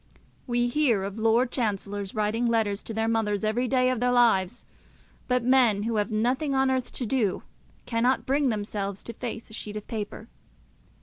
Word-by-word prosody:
We 240 0 +1
hear 240 -6 +2
of 200 +2 -5
Lord 230 +3 +3
Chancellors 205 -4 -2
writing 215 +3 0
letters 220 -3 +1
to 225 - -6
their 225 0 0
mothers 220 -2 0
every 225 +4 0
day 255 0 +2
of 255 - -2
their 250 +1 +2
lives; 235 -4 +2 0.6
but 250 -1 +1
men 240 -5 +4
who 225 0 -1
have 210 +2 0
nothing 250 +6 0
on 265 0 +3
earth 260 -1 -1
to 250 - -3
do 220 -5 0 0.4
cannot 245 +2 +1
bring 275 +1 +2
themselves 205 -2 -3
to 235 - -7
face 230 -1 -6
a - - -12
sheet 210 -1 -6
of 210 - -7
paper. 215 0 -6
230 Hz, 180 wpm, -26 LUFS, 210-250 Hz, 0.6 s, men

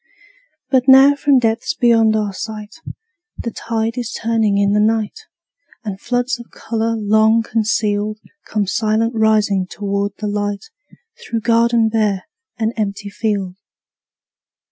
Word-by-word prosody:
But 260 -1 +2
now 270 +2 +8
from 285 -1 +2
depths 230 +4 0
beyond 225 -4 +3
our 210 -2 -1
sight, 215 +3 -7 0.6
The 235 - -4
tide 225 +1 -3
is 240 -2 -4
turning 220 -3 0
in 200 0 +2
the 210 - +3
night, 225 - 0 0.6
And 200 -3 -6
floods 245 +1 -1
of 235 - -12
color 230 0 -2
long 220 +2 +3
concealed 215 -2 -1 0.3
Come 210 -2 -1
silent 220 +3 0
rising 215 -4 +2
toward 200 0 -2
the 215 - -5
light, 205 - -3 0.5
Through 230 -1 -3
garden 230 0 +3
bare 210 -4 0 0.3
and 225 0 -1
empty 200 -1 -3
field. 200 -4 -2
220 Hz, 130 wpm, -18 LUFS, 205-230 Hz, 0.6 s, now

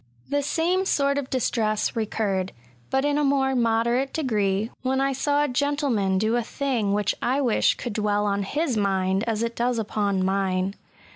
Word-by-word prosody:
The 285 0 +2
same 340 +6 +1
sort 280 -5 +1
of 270 -2 -6
distress 220 -4 0
recurred, 200 -4 -1 0.4
but 265 +1 +1
in 290 0 +1
a - - +1
more 270 -1 +2
moderate 235 +2 +1
degree, 215 -7 0
when 265 +1 0
I 275 0 +1
saw 290 +2 +1
a - - +1
gentleman 255 -8 0
do 220 +4 +1
a 240 - +2
thing 235 -4 -1
which 205 -1 +1
I 260 +3 +1
wish 250 -6 +2
could 240 - -5
dwell 210 -1 0
on 200 -1 -1
bis 300 -5 +1
mind 195 -1 +1
as 225 0 0
it 235 0 -3
does 240 0 0
upon 205 -3 0
mine. 190 0 0
230 Hz, 180 wpm, -24 LUFS, 205-275 Hz, 0.4 s, The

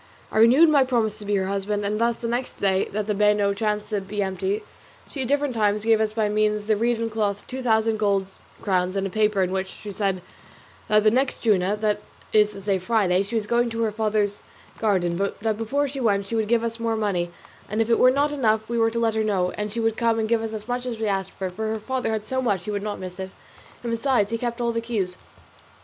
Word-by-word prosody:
I - - +1
renewed 255 +9 +7
my 285 -3 +5
promise 230 -4 0
to 205 - -9
be 205 - +1
her 190 -1 +1
husband; 200 +1 -2
and 210 +2 -1
thus 235 0 +2
the 235 - -4
next 245 +2 -3
day 190 -1 +2
that 210 +1 -3
the 210 - 0
bano 210 0 +3
chanced 210 0 -2
to 210 -2 -1
be 200 +1 -3
empty 190 +2 -2 0.4
she 275 - -5
at 255 - -1
different 285 0 +1
times 210 -1 +1
gave 225 -1 +4
us 215 -1 0
by 220 -1 +1
means 210 0 +2
of - - -14
the 215 0 +2
reed 230 +2 +1
and 230 -1 -2
cloth 205 -2 -1
two 260 +1 -6
thousand 220 -2 +2
gold 200 -2 +1 0.4
crowns 185 -2 +1
and 195 0 0
a 195 - -3
paper 210 -1 +2
in 185 - -1
which 190 0 -1
she 205 +2 -9
said 195 -3 -1 0.6
that 215 0 +4
the 215 - +5
next 260 +3 0
Juma, 200 -3 +2
that 210 -1 0 0.3
is 210 -1 +5
to 195 - -9
say 195 -1 0
Friday, 190 -2 +2
she 200 +4 -4
was 220 -2 0
going 240 +2 +1
to 230 0 -2
her 220 - +1
father's 210 -1 0 0.4
garden, 180 -6 +1
but 200 +1 -2
that 220 0 0
before 270 +7 0
she 275 0 -6
went 200 -5 +1
she 230 - -4
would 220 -1 0
give 230 +1 +2
us 230 0 -3
more 230 -1 0
money; 195 -5 -1 0.4
and 215 - -2
if 225 - +2
it 230 - +3
were 255 - +7
not 285 +3 +2
enough 220 -6 +1
we 235 0 -1
were 225 0 +4
to 230 - -5
let 230 -1 +2
her 220 0 0
know, 190 -4 +1
as 210 0 -4
she 230 - -3
would 225 -1 0
give 225 -1 +1
us 225 -1 -4
as 215 0 -6
much 245 0 -2
as 235 -2 -3
we 220 - -2
asked, 195 -2 -1
for 190 - -4
her 220 +3 -2
father 255 +2 -2
had 215 -1 -2
so 260 +3 -1
much 205 -8 0
he 210 - -3
would 205 -1 -2
not 210 0 -3
miss 185 0 -8
it, 190 0 -4 0.5
and 235 - -2
besides 230 -3 +1
she 230 - 0
kept 240 0 -3
all 235 -1 +1
the 230 0 -2
keys. 200 -6 -3
215 Hz, 260 wpm, -24 LUFS, 200-230 Hz, 0.6 s, renewed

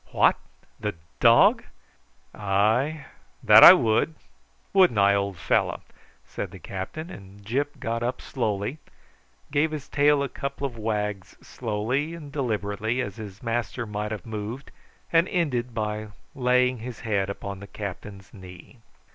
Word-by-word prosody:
"What! - - +4 0.4
the 105 -3 -3 0.2
dog? - - +6 0.7
Ay, 110 +10 +1 0.4
that - - +9
I - - +13
would; 115 +8 +1 0.6
wouldn't 185 - +5
I, 100 0 +5
old 100 -2 -1
fellow?" - - 0 0.4
said - - -5
the - - -11
captain; 155 - -6
and 100 +1 -13
Gyp 140 +7 -2
got 115 +1 -2
up 125 +2 -2
slowly, 110 +2 -3 0.7
gave 150 +2 +2
his 150 -3 -6
tail 145 0 +3
a - - -1
couple 140 +1 -5
of 130 -4 -4
wags 105 -4 -3
slowly 125 +8 -2
and 150 -4 -10
deliberately, 110 -3 -2
as 105 -4 -4
his 100 -2 -9
master 120 +1 -2
might 105 0 -4
have 105 -5 -5
moved, 110 +5 -6 0.4
and 165 +2 +4
ended 130 -9 -1
by 105 -1 -3 0.3
laying 125 -2 +2
his 120 +1 -8
head 100 -3 -1
upon 100 0 -6
the 100 - -10
captain's 100 -1 -8
knee. 95 +4 -13
115 Hz, 140 wpm, -25 LUFS, 105-135 Hz, 0.7 s, I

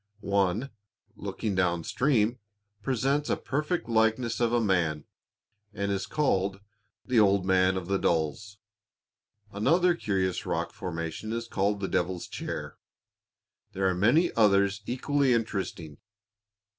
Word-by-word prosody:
One, 100 +7 +1 0.4
looking 105 - -4
down 90 -3 +1
stream, 125 - +1 0.4
presents 135 +4 0
a - - +1
perfect 150 -1 -2
likeness 115 +1 +1
of 120 -1 +2
a 120 - +3
man, 85 -8 0 0.7
and 100 -1 -1
is 95 0 -2
called 100 -9 0 0.5
"The 125 -3 +3
Old 100 -2 +4
Man 95 0 +3
of 95 - -4
the 95 +1 0
Dalles." 85 +6 -1 0.9
Another 175 - +3
curious 95 - -1
rock - - -2
formation 85 +4 -5
is 115 0 -3
called 100 -1 0
the 95 - -1
"Devil's 90 -1 -1
Chair." - - -6 0.9
There 95 0 +1
are 95 - +2
many 120 - +3
others 100 -2 +3
equally 135 +1 +1
interesting. 95 -9 -3
100 Hz, 125 wpm, -28 LUFS, 95-120 Hz, 0.9 s, Old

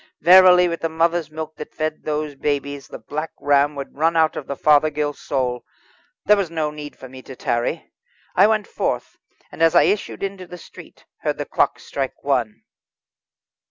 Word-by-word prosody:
Verily, 180 +1 +7
with 170 -1 -4
the 165 - -1
mother's 165 0 0
milk 155 0 -7
that 150 - -9
fed 155 0 -3
those 150 -1 -2
babes, 140 0 -3
the - - -9
Black 155 +2 -5
Ram 145 +1 +2
would 140 -1 -7
run 165 +2 +2
out 160 -1 +3
of 140 - -6
the 140 - -4
Fothergill 150 0 +2
soul. 125 -4 -3 0.6
There 210 - +6
was 195 -4 -1
no 160 -2 -2
need 150 -1 -9
for 130 - -11
me 130 0 -12
to 130 - -11
tarry. 120 +7 -2 0.4
I - - +6
went 215 -1 +1
forth, - - -3 0.3
and - - -10
as 165 -1 +4
I - - +7
issued 205 -1 -1
into 195 -2 -5
the 180 - -9
street - - -15
heard - - -2
the - - -4
clock - - +1
strike 135 -2 -5
one. 125 -6 -1
155 Hz, 185 wpm, -21 LUFS, 140-170 Hz, 0.6 s, Verily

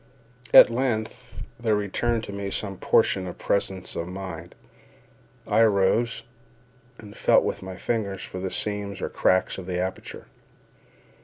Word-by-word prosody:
At - - +9
length 115 -3 -3 0.2
there 115 -2 +1
returned 110 +3 -1
to 100 - -7
me 100 0 -4
some 100 -1 -4
portion 95 -2 +2
of 90 - -8
presence 95 -2 -2
of 85 - -3
mind. 90 -3 -8 0.9
I - - +1
arose, 110 +2 +2 0.7
and 105 -2 -12
felt - - +4
with - - -3
my 95 0 -7
fingers 100 -5 -2
for 90 - -7
the 95 0 -3
seams 105 0 -2
or - - -3
cracks 95 +1 +1
of 90 - -9
the 90 -1 -2
aperture. 95 +1 -5
100 Hz, 145 wpm, -25 LUFS, 95-110 Hz, 0.9 s, At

